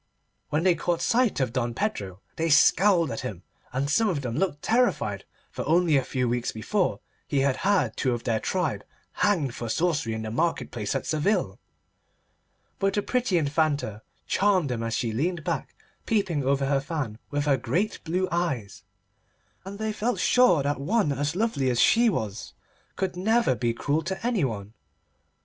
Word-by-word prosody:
When 155 Hz, +2 st, 0 dB
they 185 Hz, -1 st, +5 dB
caught 170 Hz, +1 st, -1 dB
sight 235 Hz, -, +2 dB
of 125 Hz, -3 st, 0 dB
Don 120 Hz, -2 st, -1 dB
Pedro 100 Hz, -, -3 dB
they 165 Hz, +1 st, -1 dB
scowled 170 Hz, +2 st, +5 dB
at 115 Hz, -, -4 dB
him, 90 Hz, -4 st, -6 dB, 0.3 s
and 135 Hz, +2 st, -1 dB
some 215 Hz, +9 st, +2 dB
of 160 Hz, -7 st, -1 dB
them 120 Hz, -3 st, -4 dB
looked 160 Hz, -2 st, -1 dB
terrified, 245 Hz, +2 st, +1 dB, 0.3 s
for -, -, -4 dB
only 170 Hz, -1 st, +3 dB
a 135 Hz, -, +3 dB
few 125 Hz, -2 st, -1 dB
weeks 120 Hz, 0 st, -1 dB
before 185 Hz, -, -1 dB, 0.3 s
he 140 Hz, -2 st, +1 dB
had 135 Hz, -1 st, +1 dB
had 185 Hz, -, +1 dB
two 130 Hz, -, 0 dB
of 120 Hz, -1 st, -3 dB
their 115 Hz, -2 st, 0 dB
tribe 155 Hz, -, -1 dB, 0.3 s
hanged 165 Hz, -12 st, +1 dB
for 120 Hz, -1 st, -5 dB
sorcery 150 Hz, -5 st, 0 dB
in 110 Hz, 0 st, -4 dB
the 110 Hz, -, -4 dB
market 165 Hz, +8 st, -1 dB
place 105 Hz, +1 st, -3 dB
at 135 Hz, -, -2 dB
Seville, 155 Hz, +7 st, 0 dB, 1.2 s
but 195 Hz, 0 st, +1 dB
the 205 Hz, -, 0 dB
pretty 250 Hz, -7 st, +1 dB
Infanta 145 Hz, -8 st, 0 dB, 0.2 s
charmed 190 Hz, -7 st, +2 dB
them 115 Hz, -2 st, -2 dB
as 115 Hz, 0 st, -2 dB
she 115 Hz, -, -1 dB
leaned 160 Hz, +8 st, -1 dB
back -, -, -3 dB, 0.3 s
peeping 190 Hz, -, +1 dB
over 135 Hz, +1 st, +1 dB
her 135 Hz, 0 st, +1 dB
fan 135 Hz, -8 st, -4 dB
with 145 Hz, 0 st, -1 dB
her 145 Hz, -2 st, +4 dB
great 200 Hz, +10 st, -1 dB
blue 180 Hz, +3 st, 0 dB
eyes, 145 Hz, -, -2 dB, 0.8 s
and 200 Hz, +1 st, -7 dB
they 220 Hz, 0 st, -2 dB
felt 230 Hz, +3 st, -1 dB
sure 185 Hz, -, +4 dB
that 145 Hz, 0 st, -1 dB
one 185 Hz, -1 st, +1 dB
so 155 Hz, +4 st, -1 dB
lovely 195 Hz, -, +1 dB
as 120 Hz, -2 st, 0 dB
she 235 Hz, +1 st, +5 dB
was 110 Hz, -, -4 dB, 0.4 s
could 190 Hz, -2 st, -2 dB
never 220 Hz, -, +2 dB
be 120 Hz, 0 st, 0 dB
cruel 145 Hz, +6 st, -1 dB
to 190 Hz, +7 st, -5 dB
anybody. 130 Hz, -, -1 dB
150 Hz, 175 wpm, -26 LUFS, 125-190 Hz, 1.2 s, they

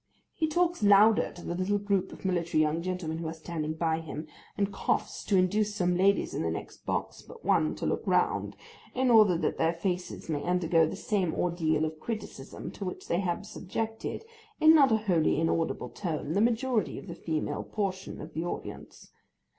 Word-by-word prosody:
He 315 Hz, -, 0 dB
talks 345 Hz, 0 st, +1 dB
louder 205 Hz, +1 st, +5 dB
to 175 Hz, -, -11 dB
the -, -, -2 dB
little 185 Hz, +3 st, 0 dB
group 200 Hz, -2 st, 0 dB
of -, -, -12 dB
military 170 Hz, -3 st, +1 dB
young 155 Hz, +2 st, +1 dB
gentlemen 175 Hz, -3 st, -3 dB
who 165 Hz, -, -4 dB
are 160 Hz, -, -3 dB
standing 155 Hz, -1 st, -4 dB
by 160 Hz, 0 st, 0 dB
him, 155 Hz, -1 st, -6 dB, 0.3 s
and 200 Hz, 0 st, 0 dB
coughs -, -, -1 dB
to 200 Hz, -, +3 dB
induce 205 Hz, +3 st, +2 dB
some 180 Hz, -3 st, +1 dB
ladies 195 Hz, +2 st, +2 dB
in -, -, -2 dB
the -, -, 0 dB
next -, -, -7 dB
box -, -, -2 dB
but 465 Hz, -, -14 dB
one -, -, +2 dB
to -, -, -5 dB
look -, -, 0 dB
round, -, -, +1 dB, 0.4 s
in 255 Hz, 0 st, +2 dB
order 210 Hz, -6 st, +6 dB
that -, -, -1 dB
their 165 Hz, +1 st, +3 dB
faces 180 Hz, +1 st, -3 dB
may 150 Hz, -3 st, -1 dB
undergo 170 Hz, -2 st, +3 dB
the 160 Hz, -, -4 dB
same 195 Hz, -5 st, -1 dB
ordeal 160 Hz, -3 st, +1 dB
of 155 Hz, 0 st, -5 dB
criticism 210 Hz, -, -6 dB
to -, -, -8 dB
which 180 Hz, -, -6 dB
they 170 Hz, -, +2 dB
have 185 Hz, +1 st, -2 dB
subjected, 220 Hz, -, -4 dB, 0.3 s
in 315 Hz, +1 st, +8 dB
not 280 Hz, -5 st, +6 dB
a 220 Hz, -, +5 dB
wholly 180 Hz, -8 st, +2 dB
inaudible 165 Hz, 0 st, 0 dB
tone, 160 Hz, -5 st, -3 dB
the 200 Hz, -, +2 dB
majority 235 Hz, 0 st, +1 dB
of -, -, -8 dB
the 170 Hz, -, -7 dB
female 160 Hz, -2 st, -2 dB
portion 195 Hz, -3 st, -4 dB
of -, -, -9 dB
the 160 Hz, -, -2 dB
audience. 175 Hz, -, -7 dB
180 Hz, 195 wpm, -29 LUFS, 165-210 Hz, 0.4 s, in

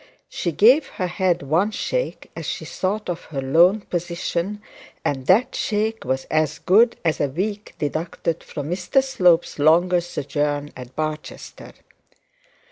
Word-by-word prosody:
She 170 Hz, -, -2 dB
gave 250 Hz, -, +5 dB
her 185 Hz, -, -4 dB
head 180 Hz, -2 st, 0 dB
one 165 Hz, +9 st, +2 dB
shake -, -, -3 dB
as -, -, -6 dB
she -, -, -4 dB
thought 205 Hz, +3 st, -2 dB
of 175 Hz, -1 st, -4 dB
her 145 Hz, -3 st, -5 dB
lone 170 Hz, +10 st, +4 dB
position, 175 Hz, +2 st, -3 dB, 0.5 s
and 135 Hz, -2 st, -2 dB
that 240 Hz, +7 st, +4 dB
shake 220 Hz, +1 st, -1 dB
was 130 Hz, +1 st, -1 dB
as 155 Hz, -1 st, +1 dB
good 225 Hz, +6 st, +4 dB
as 160 Hz, -, +1 dB
a 145 Hz, -, +2 dB
week 200 Hz, +8 st, -4 dB
deducted 160 Hz, +2 st, -3 dB
from 145 Hz, +1 st, -6 dB
Mr 185 Hz, +9 st, +1 dB
Slope's 180 Hz, -, +2 dB
longer 175 Hz, +4 st, +4 dB
sojourn 145 Hz, -2 st, -2 dB
in 125 Hz, -1 st, -8 dB
Barchester. 155 Hz, 0 st, -6 dB
175 Hz, 140 wpm, -22 LUFS, 150-205 Hz, 0.5 s, gave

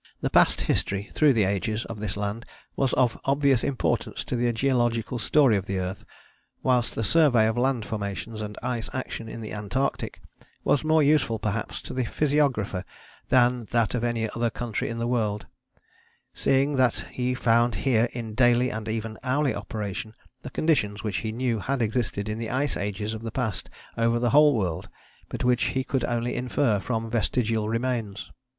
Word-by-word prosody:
The -, -, -1 dB
past -, -, +4 dB
history, 100 Hz, +1 st, -1 dB
through 150 Hz, -3 st, +5 dB
the 110 Hz, -3 st, +3 dB
ages, 105 Hz, +4 st, -1 dB
of 115 Hz, -2 st, -7 dB
this 105 Hz, -1 st, -3 dB
land 105 Hz, +3 st, -3 dB, 0.3 s
was 135 Hz, -2 st, +1 dB
of 125 Hz, -3 st, +2 dB
obvious 140 Hz, -2 st, +3 dB
importance 140 Hz, -3 st, -1 dB
to -, -, -3 dB
the 120 Hz, 0 st, +1 dB
geological 120 Hz, -1 st, 0 dB
story 130 Hz, +1 st, +4 dB
of 95 Hz, -, -4 dB
the 95 Hz, -, -2 dB
earth, 95 Hz, +1 st, -4 dB, 0.6 s
whilst 125 Hz, -3 st, +2 dB
the 115 Hz, -, -1 dB
survey 135 Hz, -5 st, +4 dB
of 110 Hz, -, +1 dB
land 125 Hz, -2 st, +1 dB
formations 110 Hz, +1 st, -4 dB
and 105 Hz, -1 st, -6 dB
ice 120 Hz, -3 st, -2 dB
action 120 Hz, -3 st, -5 dB
in 115 Hz, -, -7 dB
the 110 Hz, -, -6 dB
Antarctic 105 Hz, +6 st, -2 dB, 0.4 s
was 145 Hz, -, +2 dB
more 155 Hz, 0 st, +4 dB
useful 140 Hz, -6 st, +3 dB
perhaps 110 Hz, 0 st, -3 dB
to -, -, -7 dB
the 130 Hz, -, 0 dB
physiographer 135 Hz, -10 st, +1 dB, 0.5 s
than 125 Hz, -2 st, +3 dB
that 115 Hz, -1 st, +1 dB
of 120 Hz, -1 st, -1 dB
any 115 Hz, -2 st, 0 dB
other 115 Hz, 0 st, 0 dB
country 115 Hz, -1 st, -3 dB
in 115 Hz, -, -4 dB
the 115 Hz, -, -1 dB
world, 110 Hz, -4 st, 0 dB, 0.9 s
seeing 135 Hz, +1 st, +2 dB
that 130 Hz, -2 st, +2 dB
he 125 Hz, 0 st, -1 dB
found 120 Hz, -1 st, +3 dB
here 120 Hz, -3 st, +3 dB
in 115 Hz, -3 st, -6 dB
daily 120 Hz, +1 st, +3 dB
and 110 Hz, 0 st, -5 dB
even 110 Hz, 0 st, -4 dB
hourly 135 Hz, +2 st, +1 dB
operation 110 Hz, 0 st, -5 dB, 0.3 s
the -, -, -7 dB
conditions 115 Hz, -9 st, 0 dB
which 105 Hz, -4 st, -1 dB
he 110 Hz, -, -3 dB
knew 120 Hz, -1 st, -1 dB
had 135 Hz, +6 st, -1 dB
existed 110 Hz, -3 st, -1 dB
in 110 Hz, +1 st, -3 dB
the 115 Hz, -, -3 dB
ice 135 Hz, +3 st, 0 dB
ages 105 Hz, +2 st, -3 dB
of 110 Hz, -, -6 dB
the 115 Hz, -, -4 dB
past 110 Hz, -3 st, -3 dB, 0.3 s
over 115 Hz, 0 st, +3 dB
the 120 Hz, 0 st, +1 dB
whole 150 Hz, -1 st, +6 dB
world, 90 Hz, -6 st, -2 dB, 0.4 s
but -, -, -4 dB
which 125 Hz, -1 st, +3 dB
he 130 Hz, -, +1 dB
could 130 Hz, 0 st, -1 dB
only 120 Hz, 0 st, -1 dB
infer 125 Hz, -3 st, +1 dB
from 115 Hz, +2 st, -2 dB
vestigial 115 Hz, -1 st, 0 dB
remains. 115 Hz, -3 st, -2 dB
115 Hz, 180 wpm, -26 LUFS, 110-130 Hz, 0.9 s, whole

